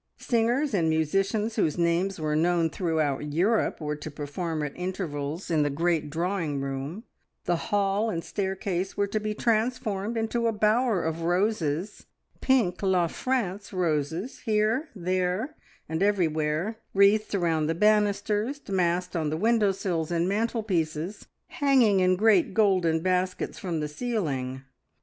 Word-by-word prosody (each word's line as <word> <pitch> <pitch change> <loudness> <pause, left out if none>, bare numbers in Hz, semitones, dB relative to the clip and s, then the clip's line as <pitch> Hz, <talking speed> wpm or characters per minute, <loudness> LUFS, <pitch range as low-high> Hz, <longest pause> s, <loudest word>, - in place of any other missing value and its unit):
Singers 240 +4 +1
and 165 -5 +2
musicians 195 +8 0
whose 160 -7 +1
names 175 +3 +1
were 155 -1 -1
known 165 0 +2
throughout 155 -5 -1
Europe 205 +8 +1
were 150 -1 -3
to 150 +1 -7
perform 150 +2 -4
at 145 - -4
intervals 175 -3 -4
in 155 -2 +3
the 145 - +2
great 160 +1 0
drawing 165 -2 -1
room; 135 +9 -4 0.4
the 175 - +2
hall 205 +2 +1
and 165 -6 -3
staircase 190 -1 -3
were 200 - +2
to 200 +2 -2
be 215 0 -3
transformed 220 -2 0
into 230 +1 0
a - - +2
bower 215 -1 +2
of 160 +1 -2
roses, 175 0 -1 0.3
pink 235 -10 +2
La 185 -3 +2
France 205 -1 -2
roses 165 - -1
here, 220 +6 0
there, 185 - -1 0.3
and 160 +2 -3
everywhere, 170 0 +1 0.2
wreathed 205 +2 +4
round 165 -4 +1
the 165 - 0
banisters, 210 - +1
massed 180 -1 0
on 160 -3 0
the 155 - -2
window 220 +1 +3
sills 175 -4 -2
and 170 0 0
mantelpieces, 195 -5 -1 0.2
hanging 270 - +3
in 185 0 +4
great 200 -2 +3
golden 185 -7 +3
baskets 185 +1 -1
from 170 -4 -3
the 150 - -1
ceiling. 145 - -3
185 Hz, 140 wpm, -27 LUFS, 160-215 Hz, 0.4 s, wreathed